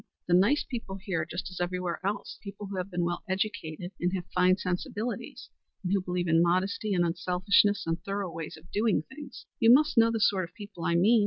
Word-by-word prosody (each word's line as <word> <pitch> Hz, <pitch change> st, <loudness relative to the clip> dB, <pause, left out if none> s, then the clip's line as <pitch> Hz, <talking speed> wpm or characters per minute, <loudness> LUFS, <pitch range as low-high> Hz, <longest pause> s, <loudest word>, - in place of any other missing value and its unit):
The 175 Hz, -, +2 dB
nice 205 Hz, +12 st, +4 dB
people 225 Hz, -6 st, -6 dB
here 175 Hz, -6 st, -2 dB
just 175 Hz, +2 st, -4 dB
as 180 Hz, -, -6 dB
everywhere 180 Hz, -1 st, -2 dB
else; 200 Hz, +1 st, -3 dB
the 200 Hz, -, -7 dB
people 200 Hz, +1 st, -8 dB
who 195 Hz, -1 st, -6 dB
have 185 Hz, +1 st, -3 dB
been 175 Hz, -2 st, -1 dB
well 175 Hz, 0 st, -2 dB
educated 185 Hz, -3 st, -3 dB
and 180 Hz, +1 st, +1 dB
have 180 Hz, -2 st, -4 dB
fine 185 Hz, 0 st, +4 dB
sensibilities, 200 Hz, +6 st, -4 dB, 0.3 s
and 185 Hz, +1 st, 0 dB
who 200 Hz, -, +2 dB
believe 180 Hz, -1 st, -2 dB
in 165 Hz, 0 st, +4 dB
modesty, 190 Hz, +4 st, +1 dB
and 175 Hz, -1 st, +3 dB
unselfishness 185 Hz, +4 st, +2 dB
and 165 Hz, 0 st, -1 dB
thorough 195 Hz, -2 st, -3 dB
ways 165 Hz, -1 st, -6 dB
of 165 Hz, +2 st, -18 dB
doing 215 Hz, +1 st, +2 dB
things. 290 Hz, +2 st, -11 dB
You 230 Hz, 0 st, +6 dB
must 285 Hz, -1 st, +5 dB
know 230 Hz, 0 st, +6 dB
the 225 Hz, -1 st, -1 dB
sort 195 Hz, -3 st, +3 dB
of 175 Hz, -, -36 dB
people 200 Hz, -5 st, -8 dB
I 170 Hz, -, +2 dB
mean. 215 Hz, +7 st, +5 dB
185 Hz, 220 wpm, -29 LUFS, 175-205 Hz, 0.3 s, You